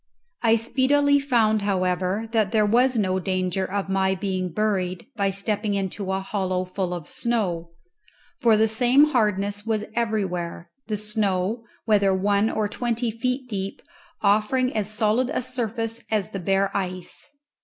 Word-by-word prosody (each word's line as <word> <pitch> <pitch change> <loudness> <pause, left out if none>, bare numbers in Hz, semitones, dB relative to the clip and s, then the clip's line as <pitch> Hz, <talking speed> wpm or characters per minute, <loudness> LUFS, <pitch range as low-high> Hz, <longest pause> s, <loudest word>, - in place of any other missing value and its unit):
I 225 -1 +4
speedily 285 +5 +3
found, 230 -6 +2
however, 185 +1 0
that 215 -4 +1
there 215 -2 +3
was 245 +4 +3
no 190 -3 +1
danger 185 0 -1
of 200 -1 -1
my 190 0 +1
being 185 -1 -2
buried 185 -2 -1
by 200 -3 +1
stepping 205 +1 -1
into 195 0 -3
a 190 0 -1
hollow 185 -2 -1
full 185 0 -3
of 170 -4 -7
snow; 185 -8 -1 0.7
for 230 -5 +4
the 220 +1 +4
same 250 +6 +4
hardness 205 -4 +1
was 215 -1 -1
everywhere, 190 -7 -2 0.2
the 215 -1 -1
snow, 210 +1 -1 0.2
whether 200 -3 +3
one 200 +3 +2
or 215 -2 0
twenty 235 +2 -2
feet 250 +3 -2
deep, 195 -3 -4 0.4
offering 215 +5 +2
as 210 -2 0
solid 220 +3 +1
a - - -1
surface 230 -2 -2
as 210 -5 0
the 195 - -4
bare 195 +2 +1
ice. 185 -2 -4
210 Hz, 150 wpm, -24 LUFS, 190-230 Hz, 0.7 s, I